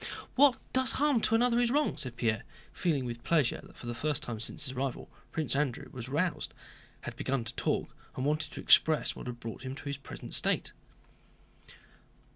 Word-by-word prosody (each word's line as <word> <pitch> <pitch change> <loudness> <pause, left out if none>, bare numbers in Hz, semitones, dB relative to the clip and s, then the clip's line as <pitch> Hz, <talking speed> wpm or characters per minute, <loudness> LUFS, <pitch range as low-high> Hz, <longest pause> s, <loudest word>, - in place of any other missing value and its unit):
"What 270 -2 +6 0.2
does 260 0 +3
harm 285 -4 +3
to 225 - +3
another 240 +1 +4
is 240 -1 +3
wrong," 295 +4 +2
said 130 -6 -3
Pierre, 115 -3 +1 0.3
feeling 150 -7 +1
with 120 -1 -5
pleasure 155 -7 +2
that - - -16
for - - -10
the 120 - -2
first 145 +3 -1
time 115 -2 -3
since 115 - -3
his 130 - -2
arrival 135 0 -3 0.2
Prince 155 -3 -1
Andrew 140 -1 0
was 125 -1 -6
roused, 155 +2 -1 0.5
had - - -6
begun 135 -2 -1
to 115 +1 -4
talk, - - -1 0.2
and 130 - -2
wanted 150 0 0
to - - -6
express 155 -1 +5
what - - -7
had 120 -1 -5
brought 115 -1 -6
him 130 0 -5
to - - -10
his 140 -1 -2
present 140 - -8
state. - - +1
140 Hz, 195 wpm, -31 LUFS, 125-170 Hz, 0.5 s, What